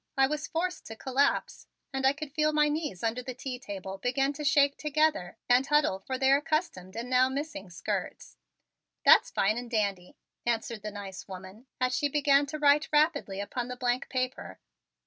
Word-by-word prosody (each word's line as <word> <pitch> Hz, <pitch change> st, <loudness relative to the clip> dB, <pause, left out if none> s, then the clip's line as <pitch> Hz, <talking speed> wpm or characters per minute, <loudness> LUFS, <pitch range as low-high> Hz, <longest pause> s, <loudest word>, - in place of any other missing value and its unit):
I 270 Hz, -, +6 dB
was 300 Hz, +3 st, -3 dB
forced 360 Hz, +2 st, -3 dB
to 225 Hz, -, -7 dB
collapse 270 Hz, +4 st, 0 dB, 0.3 s
and 265 Hz, 0 st, +2 dB
I 270 Hz, -, +4 dB
could 285 Hz, -1 st, -8 dB
feel 305 Hz, -1 st, +2 dB
my 300 Hz, 0 st, +3 dB
knees 295 Hz, -, -3 dB
under 230 Hz, +2 st, 0 dB
the 250 Hz, 0 st, -7 dB
tea 255 Hz, -1 st, -5 dB
table 195 Hz, -4 st, -7 dB
begin 270 Hz, +5 st, 0 dB
to 300 Hz, +1 st, -7 dB
shake 285 Hz, -1 st, +4 dB
together 300 Hz, -, 0 dB
and 250 Hz, +2 st, +4 dB
huddle 295 Hz, -10 st, +2 dB
for 260 Hz, +6 st, -4 dB
their 270 Hz, +1 st, +4 dB
accustomed 295 Hz, -, -2 dB
and 235 Hz, +2 st, -4 dB
now 255 Hz, +1 st, +4 dB
missing 275 Hz, -8 st, -5 dB
skirts. 170 Hz, -, -4 dB, 0.7 s
"That's -, -, +7 dB
fine 215 Hz, +4 st, +1 dB
and 245 Hz, -1 st, -8 dB
dandy," 200 Hz, -6 st, -2 dB, 0.3 s
answered 230 Hz, -1 st, -2 dB
the 210 Hz, -, -4 dB
nice 200 Hz, -2 st, -8 dB
woman 190 Hz, +5 st, -10 dB
as 255 Hz, 0 st, +1 dB
she 290 Hz, -, +1 dB
began 285 Hz, 0 st, +3 dB
to 305 Hz, -, -5 dB
write 295 Hz, 0 st, +4 dB
rapidly 295 Hz, -, +2 dB
upon 240 Hz, +4 st, -3 dB
the 250 Hz, 0 st, -6 dB
blank 245 Hz, +1 st, -1 dB
paper. 255 Hz, 0 st, -3 dB
260 Hz, 185 wpm, -29 LUFS, 220-290 Hz, 0.7 s, That's